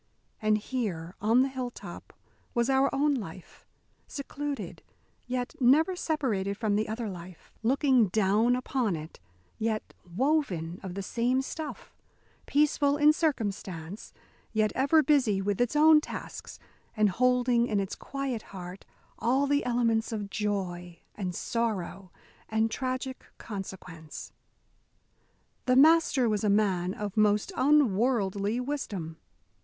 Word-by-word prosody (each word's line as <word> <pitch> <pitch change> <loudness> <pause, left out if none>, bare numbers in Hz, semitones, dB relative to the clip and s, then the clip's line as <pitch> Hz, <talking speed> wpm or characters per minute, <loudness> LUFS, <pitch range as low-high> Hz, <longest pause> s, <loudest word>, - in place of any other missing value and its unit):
And 215 0 +3
here, 205 -8 -3
on 230 +5 +4
the - - +1
hilltop, 255 -2 -7 0.4
was 235 +2 +2
our 270 +1 +4
own 290 +2 +2
life; 190 -8 -8 0.4
secluded, 280 - -5 0.5
yet 250 0 -2
never 300 +8 +4
separated 225 - -1
from 210 -2 0
the 215 +1 0
other 225 +1 -3
life; 180 -2 -10
looking 255 -1 +3
down 215 +5 +3
upon 250 -5 -1
it, 155 +1 -9 0.4
yet 220 -1 -2 0.2
woven 195 - 0
of 185 -2 -7
the 195 - -4
same 245 +6 0
stuff; 310 +2 -7 0.5
peaceful 290 0 +2
in 300 +1 +6
circumstance, 200 - -3 0.4
yet 215 -1 +2
ever 280 +4 +4
busy 265 -10 +3
with 200 +2 -1
its 245 +3 +1
own 305 0 +7
tasks, - - -7 0.4
and 215 -1 +4
holding 245 +2 +2
in 210 -3 0
its 195 -1 -3
quiet 275 -4 -4
heart 185 -1 -9 0.3
all 260 +5 +2
the 285 +1 +1
elements 235 -2 +1
of 205 -3 -4
joy 180 -5 -3 0.2
and 185 -4 -4
sorrow 200 -5 -2 0.4
and 220 +1 +1
tragic 260 +1 -3
consequence. 180 -6 -8 1.3
The 255 - +4
Master 300 -3 +5
was 210 -2 0
a 210 - +2
man 190 -3 +1
of 205 -2 -5
most 210 - +2
unworldly 230 - +2
wisdom. 210 - -4
225 Hz, 125 wpm, -29 LUFS, 195-265 Hz, 1.3 s, own